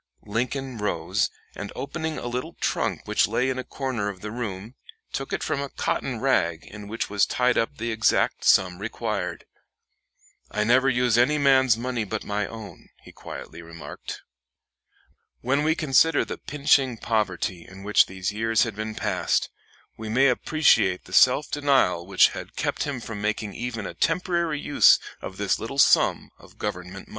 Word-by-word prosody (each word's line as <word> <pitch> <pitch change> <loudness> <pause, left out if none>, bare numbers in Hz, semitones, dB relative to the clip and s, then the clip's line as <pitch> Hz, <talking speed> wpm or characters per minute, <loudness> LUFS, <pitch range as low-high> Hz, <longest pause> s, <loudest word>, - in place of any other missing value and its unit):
Lincoln 125 +3 -3
rose, 105 - 0 0.2
and 105 - -7
opening 160 +2 -4
a - - -6
little 125 +1 -4
trunk - - -1
which - - +2
lay 130 +1 0
in 130 - -3
a - - -3
corner 125 -8 -3
of 95 -3 -8
the 105 - -6
room, 110 -2 -5 0.4
took 135 - -4
from - - -1
it 140 - -2
a - - -10
cotton - - -2
rag 85 -1 +1
in 105 0 -10
which 115 +2 -3
was 105 -1 +1
tied 125 0 +2
up 115 - -1
the 115 +1 -3
exact 110 -1 +1
sum 90 -1 +4
required. 105 -4 -4 1.0
"I 105 - -1
never 130 +4 +4
use 120 -2 +2
any 145 +5 +3
man's 130 -4 +4
money 120 -1 -2
but 105 +1 -4
my 105 0 -2
own," 110 -2 -11
he - - -13
quietly - - -9
remarked. 85 -1 -9 1.2
When 140 +4 +1
we 160 +1 +2
consider 155 +1 +3
the - - -6
pinching 140 -3 +2
poverty 100 -5 -1
in 95 +1 -12
which 105 +1 +4
these 95 0 -3
years 110 +1 +2
had 115 -4 -4
been 110 +1 -5
passed, - - 0 0.5
we 110 0 -6
may 130 +5 +4
appreciate 125 - +2
the - - -12
self 130 +4 +5
denial 135 -12 +2
denial - - -19
which 95 -1 +5
had - - -9
kept - - -1
him 140 -4 -4
from 110 -3 -6
making 105 -1 -2
even 115 -3 -4
a - - -5
temporary 170 -2 0
use 145 0 +5 0.2
of 95 - -7
this 100 -2 0
little 125 +5 -6
sum 140 - +4
of - - -18
government 90 -3 -4
money. - - -21
115 Hz, 175 wpm, -25 LUFS, 105-135 Hz, 1.2 s, self